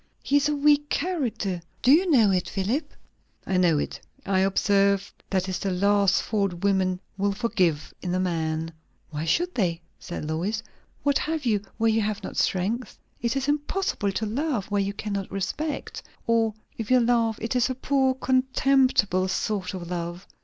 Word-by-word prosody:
He 285 Hz, -, +3 dB
is 290 Hz, +1 st, +2 dB
a 295 Hz, -, +1 dB
weak 295 Hz, 0 st, +3 dB
character; 250 Hz, -, -1 dB, 0.2 s
do 255 Hz, -, +6 dB
you 355 Hz, +5 st, +5 dB
know 230 Hz, -10 st, +5 dB
it, 180 Hz, -2 st, 0 dB
Philip?" 215 Hz, +11 st, -1 dB, 0.5 s
"I 190 Hz, -, 0 dB
know 175 Hz, -4 st, +4 dB
it. -, -, -3 dB, 0.2 s
I 195 Hz, -1 st, +2 dB
observe, 195 Hz, +1 st, +2 dB, 0.2 s
that 190 Hz, -1 st, 0 dB
is 185 Hz, -1 st, -2 dB
the 195 Hz, -, -1 dB
last 200 Hz, +1 st, +3 dB
fault 200 Hz, -4 st, 0 dB
women 190 Hz, -2 st, +2 dB, 0.2 s
will 200 Hz, 0 st, +1 dB
forgive 185 Hz, -9 st, 0 dB
in 180 Hz, -1 st, -2 dB
a -, -, +1 dB
man." 165 Hz, -3 st, -1 dB, 0.4 s
"Why 155 Hz, +1 st, -3 dB
should 350 Hz, -, +1 dB
they?" 175 Hz, -7 st, 0 dB, 0.2 s
said 175 Hz, -, -6 dB
Lois. 185 Hz, +8 st, -2 dB, 0.4 s
"What 285 Hz, -1 st, +3 dB
have 315 Hz, -2 st, -2 dB
you, 210 Hz, -4 st, +2 dB, 0.2 s
where 225 Hz, 0 st, +3 dB
you 220 Hz, 0 st, +2 dB
have 210 Hz, -1 st, -2 dB
not -, -, -6 dB
strength? 210 Hz, +6 st, -1 dB, 0.2 s
It 235 Hz, +2 st, 0 dB
is 270 Hz, 0 st, -1 dB
impossible 295 Hz, -, 0 dB
to 220 Hz, -, -1 dB
love 235 Hz, -, -2 dB
where 205 Hz, -1 st, +2 dB
you 200 Hz, +1 st, -2 dB
cannot 200 Hz, -2 st, -4 dB
respect. 280 Hz, +11 st, -3 dB, 0.2 s
Or 225 Hz, -2 st, +2 dB, 0.2 s
if 220 Hz, -, -4 dB
you 255 Hz, 0 st, +6 dB
love, 230 Hz, -2 st, +2 dB
it 230 Hz, +3 st, -3 dB
is 250 Hz, +1 st, +3 dB
a 260 Hz, -, -2 dB
poor 265 Hz, 0 st, +1 dB
contemptible 255 Hz, -7 st, +2 dB
sort 190 Hz, 0 st, -2 dB
of 175 Hz, -1 st, -7 dB
love." 175 Hz, +2 st, -4 dB
205 Hz, 175 wpm, -25 LUFS, 185-255 Hz, 0.5 s, do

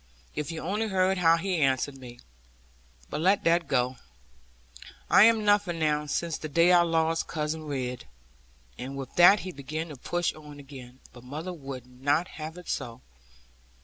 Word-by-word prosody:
If 150 Hz, +2 st, -4 dB
you 165 Hz, -, -6 dB
only 210 Hz, +5 st, -1 dB
heard 190 Hz, -1 st, +1 dB
how 165 Hz, -1 st, +5 dB
he 185 Hz, +1 st, -1 dB
answered 135 Hz, -1 st, +1 dB
me. 120 Hz, -2 st, -11 dB, 0.9 s
But -, -, -3 dB
let 190 Hz, +4 st, +3 dB
that 170 Hz, -1 st, +2 dB
go, 125 Hz, -2 st, 0 dB, 1.1 s
I 205 Hz, -, +8 dB
am 225 Hz, -2 st, +3 dB
nothing 205 Hz, -4 st, +2 dB
now, 150 Hz, -1 st, 0 dB
since 165 Hz, +2 st, -2 dB
the 155 Hz, -, -6 dB
day 170 Hz, +4 st, +4 dB
I 175 Hz, -1 st, +7 dB
lost 165 Hz, -1 st, +1 dB
Cousin 155 Hz, 0 st, -3 dB
Ridd.' 125 Hz, -4 st, -4 dB, 0.7 s
And 135 Hz, +2 st, -6 dB
with 135 Hz, -2 st, -7 dB
that 180 Hz, +4 st, +7 dB
he 185 Hz, -, -6 dB
began 155 Hz, +2 st, -5 dB
to 150 Hz, -, -8 dB
push 175 Hz, +6 st, -2 dB
on 150 Hz, -2 st, -12 dB
again; 130 Hz, -2 st, -12 dB
but 120 Hz, -, -14 dB
mother 155 Hz, +8 st, -6 dB
would 135 Hz, -6 st, -8 dB
not 140 Hz, +7 st, -1 dB
have 155 Hz, +2 st, -6 dB
it 180 Hz, -, -12 dB
so. 120 Hz, +1 st, -4 dB
155 Hz, 170 wpm, -27 LUFS, 135-175 Hz, 1.1 s, I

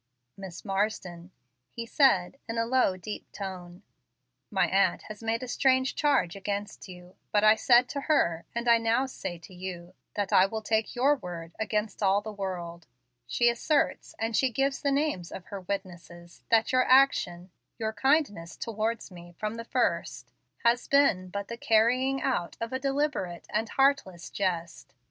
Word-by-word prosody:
"Miss 190 Hz, -4 st, -9 dB
Marsden," 195 Hz, -3 st, -2 dB, 0.4 s
he 235 Hz, -, -6 dB
said, 230 Hz, -5 st, +3 dB
in 230 Hz, -, -3 dB
a 230 Hz, -, +1 dB
low, 235 Hz, -6 st, +2 dB
deep 210 Hz, +3 st, -8 dB
tone, 185 Hz, -1 st, -8 dB, 0.7 s
"my -, -, +2 dB
aunt -, -, +2 dB
has 215 Hz, 0 st, -10 dB
made 225 Hz, +2 st, -1 dB
a -, -, -5 dB
strange 260 Hz, +1 st, +2 dB
charge 285 Hz, -, +1 dB
against 200 Hz, +1 st, -5 dB
you, 180 Hz, 0 st, -13 dB, 0.2 s
but 205 Hz, 0 st, +3 dB
I 215 Hz, 0 st, +8 dB
said 240 Hz, +2 st, +4 dB
to 280 Hz, -, -3 dB
her, 170 Hz, -, +1 dB
and 235 Hz, +1 st, -2 dB
I 235 Hz, -1 st, +6 dB
now 230 Hz, +3 st, +2 dB
say 185 Hz, -9 st, -6 dB
to 170 Hz, +3 st, -14 dB
you, 180 Hz, -1 st, -7 dB, 0.2 s
that 205 Hz, -2 st, -2 dB
I 185 Hz, -, +6 dB
will 220 Hz, +1 st, -5 dB
take 220 Hz, +1 st, 0 dB
your 275 Hz, +4 st, +3 dB
word 170 Hz, -6 st, -8 dB
against 215 Hz, 0 st, -2 dB
all 195 Hz, 0 st, +4 dB
the 215 Hz, +1 st, -7 dB
world. 175 Hz, -4 st, -5 dB, 0.4 s
She 240 Hz, -, +2 dB
asserts, 260 Hz, +5 st, 0 dB
and 225 Hz, 0 st, -2 dB
she 265 Hz, -, +3 dB
gives 270 Hz, +3 st, -1 dB
the 285 Hz, -, +1 dB
names 275 Hz, -, -1 dB
of 185 Hz, -, -8 dB
her 200 Hz, -2 st, -7 dB
witnesses, 175 Hz, -3 st, -7 dB
that 225 Hz, -1 st, +3 dB
your 255 Hz, 0 st, +4 dB
action 190 Hz, -10 st, +3 dB, 0.3 s
your 220 Hz, -1 st, -2 dB
kindness 265 Hz, -, +1 dB
towards 225 Hz, -1 st, -3 dB
me 175 Hz, -1 st, -12 dB
from 215 Hz, 0 st, -3 dB
the 230 Hz, 0 st, -7 dB
first -, -, -1 dB, 0.3 s
has 235 Hz, +1 st, +3 dB
been 245 Hz, -10 st, +3 dB
but 200 Hz, +2 st, -5 dB
the 235 Hz, -, -6 dB
carrying 250 Hz, +5 st, +2 dB
out 210 Hz, -10 st, -1 dB
of 230 Hz, +2 st, -4 dB
a 260 Hz, -, -1 dB
deliberate 275 Hz, -, -2 dB
and 220 Hz, +2 st, -1 dB
heartless 270 Hz, -11 st, +1 dB
jest. 175 Hz, -4 st, -3 dB
215 Hz, 170 wpm, -28 LUFS, 185-250 Hz, 0.7 s, I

